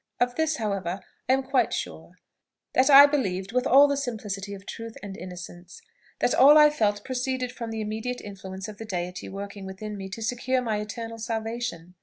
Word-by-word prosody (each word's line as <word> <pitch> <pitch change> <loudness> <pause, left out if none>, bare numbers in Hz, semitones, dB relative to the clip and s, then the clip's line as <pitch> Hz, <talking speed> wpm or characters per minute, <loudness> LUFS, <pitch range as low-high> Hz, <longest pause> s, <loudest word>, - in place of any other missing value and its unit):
Of 245 0 +2
this, 320 +2 0
however, 195 - -2 0.3
I - - +6
am 265 0 +1
quite 265 -1 +1
sure, - - -5 0.6
that 260 +3 +4
I 280 0 +11
believed 195 -10 -1
with 250 +1 +1
all 280 +3 +7
the 285 - 0
simplicity 210 -7 -4
of 195 0 -13
truth 230 +1 -7
and 200 -2 -6
innocence, 180 -1 -9 0.4
that - - +3
all 290 +3 +8
I 300 0 +8
felt 205 -7 0
proceeded 255 -1 -2
from 235 -2 -6
the 225 -1 -4
immediate 220 +4 -3
influence 195 -1 -8
of 210 -1 -10
the 225 - -6
Deity 180 -2 -4
working 200 +1 -7
within 210 +3 -6
me 195 -1 -6
to 225 +3 -6
secure 250 +3 0
my 225 -4 -1
eternal 225 +2 -6
salvation. 225 -6 -4
220 Hz, 190 wpm, -26 LUFS, 195-250 Hz, 0.6 s, I